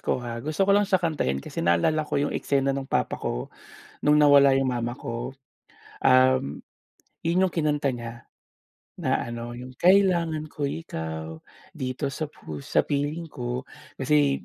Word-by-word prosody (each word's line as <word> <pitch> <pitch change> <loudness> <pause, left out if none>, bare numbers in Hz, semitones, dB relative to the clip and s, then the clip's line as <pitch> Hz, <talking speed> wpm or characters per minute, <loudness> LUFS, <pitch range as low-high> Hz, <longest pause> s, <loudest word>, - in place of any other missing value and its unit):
ko - - 0
ha. 115 0 -4
Gusto 155 +7 0
ko 200 - +4
lang 205 0 +3
sa 190 - +4
kanta 165 - -1
yun 70 0 -2
kasi - - -5
naalala 85 - +2
ko 150 - -3
yung 145 +1 0
eksena 135 -1 +1
nung 135 -1 -4
papa - - -1
ko - - -4 0.5
nung 150 0 +5
nawala 140 -2 +7
yung 135 - 0
mama 120 0 -2
ko, 120 -1 -5 0.7
um, 130 - +4 0.6
yun 175 +3 +2
yung 185 - -3
kinanta 150 -4 +1
niya 115 0 -8 0.8
na - - +2
ano, 120 0 -6
yung 125 +1 -8
kailangan 175 -4 +4
ko 145 -2 -2
ikaw 80 - -5 0.3
dito 130 +2 -3
sa 155 +1 -3
pus 75 - -9
sa - - +3
piling 150 +3 -2
ko 125 0 -4 0.3
kasi 140 0 +2
140 Hz, 160 wpm, -26 LUFS, 120-155 Hz, 0.8 s, nawala